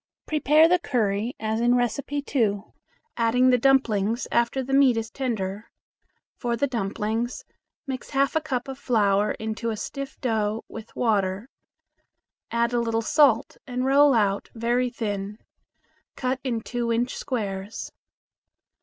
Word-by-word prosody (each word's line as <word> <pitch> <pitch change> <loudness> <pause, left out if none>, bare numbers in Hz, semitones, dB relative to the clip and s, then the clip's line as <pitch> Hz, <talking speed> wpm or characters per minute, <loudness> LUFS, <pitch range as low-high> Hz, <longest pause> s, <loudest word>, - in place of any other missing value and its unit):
Prepare 305 +1 +4
the 360 +1 +3
curry 225 - -1
as 220 +1 -1
in 240 +1 +4
No. 245 0 +3 0.2
1, 240 -8 0 0.5
adding 250 +3 +3
the 250 - +4
dumplings 235 -4 +2
after 235 +3 +1
the 270 +2 -4
meat 270 -4 +5
is 225 0 -3
tender. 215 -5 -3 0.7
For 240 -2 -1
the 235 - +1
dumplings, 225 0 -2 0.4
mix 265 -3 -5
half 275 +1 +1
a 315 - +2
cup 260 -5 -3
of 270 0 -7
flour 210 -5 +2
into 220 +1 -4
a 220 - -3
stiff 275 +5 -6
dough 220 -3 -1
with 225 0 -10
water. 205 -1 0 1.0
Add 235 +1 0
a 240 - +2
little 230 -1 0
salt, 265 -2 +3
and 250 0 -2
roll 280 0 +5
out 200 -3 +1
very 240 +2 +1
thin. 205 -3 -4 0.8
Cut 255 0 -1
in 240 -4 -1
two 240 0 -2
inch 240 +2 0
squares. 205 -4 -4
235 Hz, 140 wpm, -25 LUFS, 215-260 Hz, 1.0 s, meat